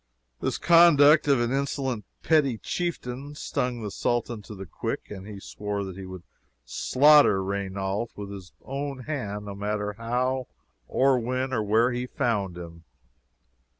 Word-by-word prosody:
This -, -, -1 dB
conduct 155 Hz, -4 st, +6 dB
of 140 Hz, -3 st, +4 dB
an 120 Hz, 0 st, 0 dB
insolent 135 Hz, -4 st, -2 dB, 0.2 s
petty 145 Hz, -7 st, +3 dB
chieftain 145 Hz, -3 st, -4 dB
stung 125 Hz, -5 st, -2 dB
the 105 Hz, -, -4 dB
Sultan 120 Hz, 0 st, -1 dB
to 105 Hz, +1 st, -10 dB
the 95 Hz, 0 st, -8 dB
quick, -, -, -5 dB
and 95 Hz, -1 st, -8 dB
he 105 Hz, -2 st, -8 dB
swore 105 Hz, 0 st, -4 dB
that 95 Hz, -2 st, -7 dB
he 95 Hz, 0 st, -8 dB
would 95 Hz, -2 st, -9 dB, 0.4 s
slaughter 135 Hz, -, +5 dB
Raynauld 100 Hz, +2 st, -2 dB
with 100 Hz, -1 st, -7 dB
his 95 Hz, -3 st, -9 dB
own 140 Hz, 0 st, -4 dB
hand, 105 Hz, -8 st, -4 dB
no 100 Hz, -, -6 dB
matter 105 Hz, +1 st, -2 dB
how, 125 Hz, +2 st, -1 dB, 0.4 s
or 135 Hz, -1 st, +3 dB
when, 130 Hz, +2 st, -2 dB
or 115 Hz, -, +1 dB
where 110 Hz, +4 st, +3 dB
he 125 Hz, +1 st, -3 dB
found 105 Hz, -, -1 dB
him. 85 Hz, -1 st, -10 dB
120 Hz, 150 wpm, -26 LUFS, 100-135 Hz, 0.4 s, conduct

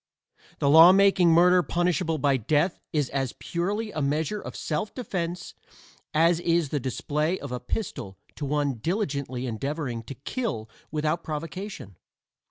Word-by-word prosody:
The 140 Hz, -, 0 dB
law 160 Hz, +5 st, +9 dB
making 195 Hz, -2 st, +5 dB
murder 180 Hz, +2 st, +6 dB
punishable 175 Hz, -1 st, 0 dB
by 140 Hz, -1 st, +2 dB
death 150 Hz, -, +1 dB
is 150 Hz, -4 st, +1 dB
as 135 Hz, -3 st, -2 dB
purely 205 Hz, +6 st, -2 dB
a 155 Hz, -, -3 dB
measure 155 Hz, +9 st, -1 dB
of -, -, -8 dB
self 170 Hz, +7 st, -3 dB
defense 180 Hz, -8 st, -4 dB, 0.6 s
as 165 Hz, +2 st, +3 dB
is 170 Hz, -3 st, +1 dB
the 145 Hz, -, -1 dB
display 150 Hz, +6 st, -1 dB
of 140 Hz, -, -7 dB
a 125 Hz, -, -3 dB
pistol 120 Hz, -, -5 dB, 0.2 s
to -, -, -6 dB
one 145 Hz, -3 st, -1 dB
diligently 140 Hz, -, -2 dB
endeavoring 130 Hz, +1 st, -3 dB
to 135 Hz, -, -7 dB
kill 145 Hz, -, -4 dB, 0.2 s
without 155 Hz, +2 st, -1 dB
provocation. 165 Hz, -, -6 dB
155 Hz, 145 wpm, -26 LUFS, 140-180 Hz, 0.6 s, law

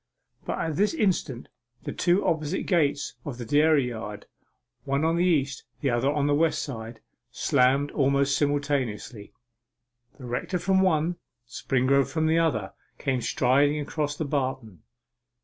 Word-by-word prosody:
But -, -, -3 dB
at 160 Hz, -2 st, -2 dB
this 210 Hz, +10 st, +2 dB
instant 175 Hz, -, -1 dB, 0.4 s
the -, -, -4 dB
two 180 Hz, +3 st, +1 dB
opposite 160 Hz, +2 st, -1 dB
gates 145 Hz, -6 st, 0 dB
of 135 Hz, -5 st, -6 dB
the 120 Hz, -, -6 dB
dairy 145 Hz, 0 st, +3 dB
yard, 105 Hz, -3 st, -7 dB, 0.6 s
one 140 Hz, +2 st, 0 dB
on 165 Hz, +1 st, +2 dB
the 170 Hz, -, +2 dB
east, 140 Hz, -7 st, +1 dB, 0.2 s
the 140 Hz, -, +1 dB
other 120 Hz, +3 st, +1 dB
on 145 Hz, -1 st, 0 dB
the 145 Hz, -, +2 dB
west 160 Hz, +2 st, +1 dB
side, 115 Hz, -4 st, -7 dB, 0.3 s
slammed 140 Hz, +2 st, +2 dB
almost 140 Hz, 0 st, +2 dB
simultaneously. 140 Hz, -8 st, -2 dB, 0.9 s
The 130 Hz, -, -10 dB
rector 125 Hz, +9 st, -2 dB
from 190 Hz, +2 st, +2 dB
one, 170 Hz, -1 st, +1 dB, 0.3 s
Springrove 135 Hz, +2 st, +1 dB
from 160 Hz, -1 st, 0 dB
the 160 Hz, +1 st, +3 dB
other, 110 Hz, -13 st, 0 dB, 0.2 s
came 130 Hz, -3 st, -1 dB
striding 140 Hz, +5 st, +2 dB
across 145 Hz, 0 st, -3 dB
the 160 Hz, -, -2 dB
barton. 130 Hz, -, -3 dB
140 Hz, 150 wpm, -26 LUFS, 130-160 Hz, 0.9 s, dairy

